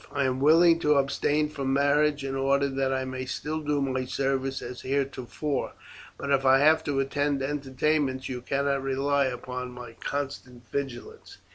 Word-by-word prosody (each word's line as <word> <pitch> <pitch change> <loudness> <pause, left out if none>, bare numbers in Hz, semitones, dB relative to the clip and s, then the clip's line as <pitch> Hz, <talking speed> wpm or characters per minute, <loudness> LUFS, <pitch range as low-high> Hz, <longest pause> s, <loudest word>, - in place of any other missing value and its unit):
I 140 - 0
am 130 -1 0
willing 165 +4 +6
to 150 -2 +3
abstain 145 +2 +1
from 135 -3 -2
marriage 145 +1 +2
in 135 - -3
order 140 +1 +2
that 135 0 -1
I 130 0 -1
may 130 0 -5
still 150 +4 -3
do 150 -1 -1
my 130 -1 -1
service 135 0 -1
as 125 +1 -7
heretofore; 135 +1 -2 0.4
but 140 - -4
if 135 -1 +3
I 135 0 +6
have 155 +3 +4
to 145 -2 0
attend 140 0 0
entertainments, 135 -1 -1
you 125 -1 -5
cannot 140 +1 0
rely 135 +1 +1
upon 125 0 -4
my 125 -2 -9
constant 130 -4 -5
vigilance. 135 -4 -6
135 Hz, 165 wpm, -27 LUFS, 130-145 Hz, 0.4 s, willing